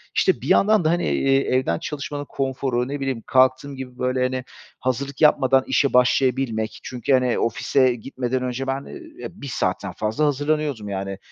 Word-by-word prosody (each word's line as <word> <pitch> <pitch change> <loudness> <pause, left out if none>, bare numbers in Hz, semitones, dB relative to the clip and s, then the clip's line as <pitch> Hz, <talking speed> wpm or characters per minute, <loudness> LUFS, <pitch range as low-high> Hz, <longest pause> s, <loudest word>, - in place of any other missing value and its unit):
işte, - - +2
bir - - -6
yandan 210 -4 +4
da, - - +4
hani, 175 +1 +1
eee, 135 0 +2
evden 130 -11 0
çalışmanın 145 0 -5
konforu, 130 -2 -1
ne 145 +1 -4
bileyim, 135 -4 -3
kalktığım 130 +2 +2
gibi, 130 -1 -8
böyle, 130 0 0
hani, 130 0 -1 0.4
hazırlık 135 +3 -3
yapmadan 135 -3 +4
işe 140 - +2
başlayabilmek 125 -3 +1
çünkü 125 +2 -2
hani, 125 -2 +2
ofise 125 +3 +2
gitmeden 125 +1 -3
önce 130 +1 -3
ben, 135 +1 -2
eee, 340 -1 -11
ya - - -4
1 140 - -6
saatten - - -2
fazla 110 +8 -1
hazırlanıyordum 145 -6 -1
yani, 95 0 -4
130 Hz, 170 wpm, -22 LUFS, 125-140 Hz, 0.4 s, yandan